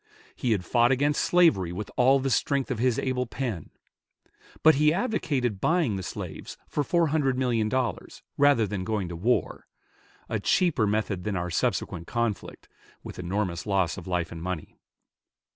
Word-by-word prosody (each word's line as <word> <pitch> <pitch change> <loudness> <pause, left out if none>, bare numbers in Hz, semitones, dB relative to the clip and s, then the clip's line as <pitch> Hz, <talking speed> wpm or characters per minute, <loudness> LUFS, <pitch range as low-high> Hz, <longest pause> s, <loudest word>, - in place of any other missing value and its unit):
He 120 - -1
had 95 -4 -2
fought 120 +5 +3
against 145 +3 +2
slavery 160 - +3
with 100 +4 -6
all 135 +2 +4
the 135 0 -1
strength 135 +4 0
of 120 - -2
his 125 -1 +2
able 125 -1 -1
pen; 115 - -4 0.9
but 160 - +8
he 150 +1 +3
advocated 145 - -1
buying 160 - +2
the 95 - -3
slaves - - -7
for 145 - -1
four 170 +2 +2
hundred 140 -4 +1
million 120 -4 +1
dollars 125 -6 -3
rather 145 -6 +4
than 100 -2 -4
going 100 -3 -2
to 85 - -6
war, 115 +9 -1 0.6
a - - -2
cheaper 155 - +2
method 100 -3 -1
than 105 -2 -2
our 90 -1 -3
subsequent 85 0 -1
conflict, 115 -4 -3 0.4
with - - -9
enormous 90 -1 -2
loss 95 -5 +1
of 90 - -9
life 90 -3 -1
and 80 - -7
money. 90 -3 -5
115 Hz, 165 wpm, -26 LUFS, 95-135 Hz, 0.9 s, but